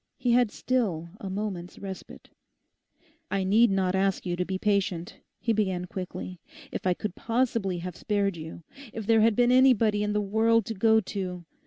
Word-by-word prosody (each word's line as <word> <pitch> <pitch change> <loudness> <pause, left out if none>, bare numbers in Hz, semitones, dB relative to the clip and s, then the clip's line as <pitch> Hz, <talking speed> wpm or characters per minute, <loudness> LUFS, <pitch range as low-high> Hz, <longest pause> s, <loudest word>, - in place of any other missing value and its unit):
He 250 -2 0
had 245 -1 +4
still 195 -11 -1
a 195 - -6
moment's 190 -3 -4
respite. 190 -2 -9 1.0
'I 195 - 0
need 220 +5 +4
not 190 -2 +1
ask 195 0 0
you 175 -1 -1
to 180 - -1
be 190 +1 -3
patient,' 190 -4 -1 0.2
he 230 - 0
began 190 -4 0
quickly; 180 -1 -6 0.3
'if - - -3
I 180 - +2
could 210 -1 -4
possibly 230 -5 0
have 180 -2 -5
spared 200 -3 0
you—if 210 - -9
there 225 0 +4
had 225 -1 +4
been 245 +1 +4
anybody 235 -5 +4
in 210 0 0
the 210 - +1
world 220 +2 +2
to 225 - -4
go 220 +2 +4
to... 180 -3 -5
200 Hz, 175 wpm, -27 LUFS, 185-225 Hz, 1.0 s, had